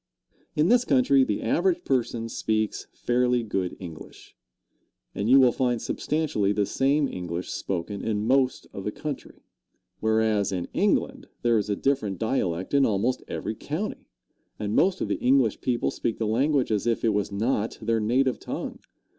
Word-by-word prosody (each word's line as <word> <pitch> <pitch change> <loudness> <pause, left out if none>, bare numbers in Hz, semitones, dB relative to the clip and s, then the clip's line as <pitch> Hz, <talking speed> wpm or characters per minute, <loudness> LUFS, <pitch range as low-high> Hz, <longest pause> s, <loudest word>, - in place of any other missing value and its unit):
In 155 +4 +3
this 245 0 +5
country 135 - +4
the 105 -5 -2
average 175 +8 +1
person 120 -3 0
speaks 110 -1 -2
fairly 125 0 +1
good 95 -4 -2
English, 85 -4 -11 0.8
and 100 +3 -2
you 135 +2 +8
will 130 -2 +6
find 125 -1 0
substantially 140 -8 -1
the 105 0 +1
same 140 +6 +1
English 90 -3 -5
spoken 95 +2 -3
in 105 -1 -1
most 130 +1 +2
of 95 - -6
the 105 - -2
country; 150 +4 -7 0.6
whereas 110 -2 +2
in 90 -2 -3
England - - 0 0.2
there 120 -2 +4
is 105 - -3
a 100 - +1
different 110 -7 0
dialect 95 -5 -1
in 140 -1 +5
almost 115 +3 +1
every 110 - -3
county, 155 - -5 0.5
and 105 -1 -3
most 185 +1 +3
of - - 0
the - - -1
English 125 -4 +3
people 120 -2 0
speak 115 - -2
the 115 - -1
language 130 +4 +1
as 105 +2 0
if 115 - 0
was 105 -3 +1
not 110 +2 -1
their 115 0 0
native 125 +2 +1
tongue. - - -5
115 Hz, 165 wpm, -26 LUFS, 105-135 Hz, 0.8 s, you